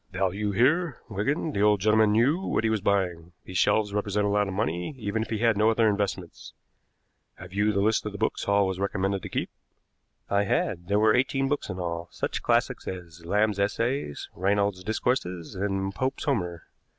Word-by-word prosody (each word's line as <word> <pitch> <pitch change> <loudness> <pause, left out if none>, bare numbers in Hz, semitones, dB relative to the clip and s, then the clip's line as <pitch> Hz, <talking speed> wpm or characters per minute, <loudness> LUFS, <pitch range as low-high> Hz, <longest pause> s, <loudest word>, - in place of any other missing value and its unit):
"Value 95 +2 -1
here, 140 - +2
Wigan. 115 - -1
The 100 - -1
old 105 -1 +4
gentleman 110 +1 +4
knew 130 +10 +3
what 190 - -1
he 110 - +2
was 110 -2 0
buying. 90 -4 0
These 90 -1 -2
shelves 105 +1 +2
represent 105 0 0
a - - +1
lot 105 0 +2
of 95 - -4
money, 90 - -2
even 110 -1 -2
if 110 - -4
he 110 - -1
had 115 0 +3
no 105 +2 +4
other 115 0 +3
investments. 100 -4 -3 0.8
Have 90 0 -11
you 105 +2 +2
the 100 -1 0
list 110 +2 +2
of - - -4
the 100 - -7
books 110 - -1
Hall 100 0 +3
was 95 -1 -3
recommended 95 0 -1
to - - -7
keep?" - - -3 0.8
I 100 0 +1
had. 90 -2 -1
There 100 +1 +2
were 110 0 +5
eighteen 135 +2 +1
books 145 -4 -2
in 95 - -4
all, 85 -1 -3
such - - -3
classics - - 0
as 85 -3 -7
"Lamb's 105 +1 +1
Essays," 115 - -1
"Reynold's 100 0 0
Discourses," 90 -5 -2
and 95 0 -2
"Pope's 130 +6 -2
Homer." 90 - -1
100 Hz, 195 wpm, -27 LUFS, 95-110 Hz, 0.8 s, were